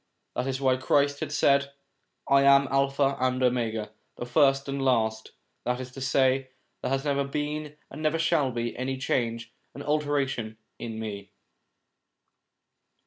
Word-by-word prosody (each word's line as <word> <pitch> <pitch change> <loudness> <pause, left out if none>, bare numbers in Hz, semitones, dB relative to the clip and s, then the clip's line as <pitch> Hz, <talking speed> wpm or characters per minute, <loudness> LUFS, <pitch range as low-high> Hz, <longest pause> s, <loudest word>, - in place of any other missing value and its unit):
That 125 - -1
is 135 -1 -2
why 130 -2 +2
Christ 140 +2 +2
has 150 -1 -3
said: 140 0 +3 0.3
' - - -39
I 140 0 +5
am 140 0 +6
Alpha 135 0 +2
and 130 0 +1
Omega, 115 -4 0 0.3
the - - -4
first 135 +2 +3
and 140 0 -3
the - - -1
last 110 -4 0
': - - -48
that 125 0 -1
is 130 -1 -7
to 135 - -9
say, 130 0 +2 0.3
there - - -2
has 135 +2 -1
never 140 -1 +1
been 150 +1 -4
and 145 - -8
never 155 +1 +1
shall 165 -4 +2
be 120 -1 -3
any 130 +1 -3
change 115 -3 -2 0.2
and 140 - -7
alteration 140 -7 -1 0.2
in 115 -2 -5
me. 105 -2 -6
135 Hz, 165 wpm, -27 LUFS, 125-140 Hz, 0.3 s, am